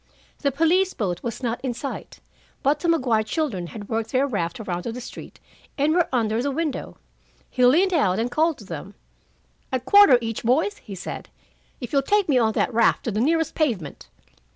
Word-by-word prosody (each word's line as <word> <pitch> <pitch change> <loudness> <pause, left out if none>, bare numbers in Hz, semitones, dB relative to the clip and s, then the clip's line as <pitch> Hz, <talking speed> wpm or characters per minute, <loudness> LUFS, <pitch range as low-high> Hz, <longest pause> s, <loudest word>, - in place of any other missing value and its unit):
The 280 - 0
police 350 +6 +2
boat 180 -6 -2
was 235 +2 -5
not 235 -1 -2
in 255 -3 -3
sight, 275 +3 -7 0.4
but 285 +2 +2
the 340 - -1
Maguire 255 -9 +2
children 215 - -2
had 205 +2 -9
worked 225 0 -2
their 265 +1 +2
raft 190 -10 -3
around 180 -5 -3
to 230 - -4
the 245 - -6
street 245 - -10 0.4
and 295 +2 +2
were 350 -1 +2
under 225 -2 +1
the 280 - -1
window. 300 0 -3 0.5
He 250 - 0
leaned 360 +9 +4
out 200 - +2
and 235 +2 -1
called 315 +3 +1
to 210 - -13
them. 180 +3 -8 0.8
"A 260 - 0
quarter 270 +2 +7
each, 225 -2 -4
boys," 315 - +1
he 200 - -9
said, 180 - -7 0.5
"if 245 0 -7
you'll 275 - +4
take 410 +7 +2
me 270 -5 +3
on 220 -2 +2
that 250 - 0
raft 230 0 +3
to 230 - -2
the 215 +2 -1
nearest 325 +4 +1
pavement." 220 - -2
250 Hz, 200 wpm, -23 LUFS, 220-310 Hz, 0.8 s, quarter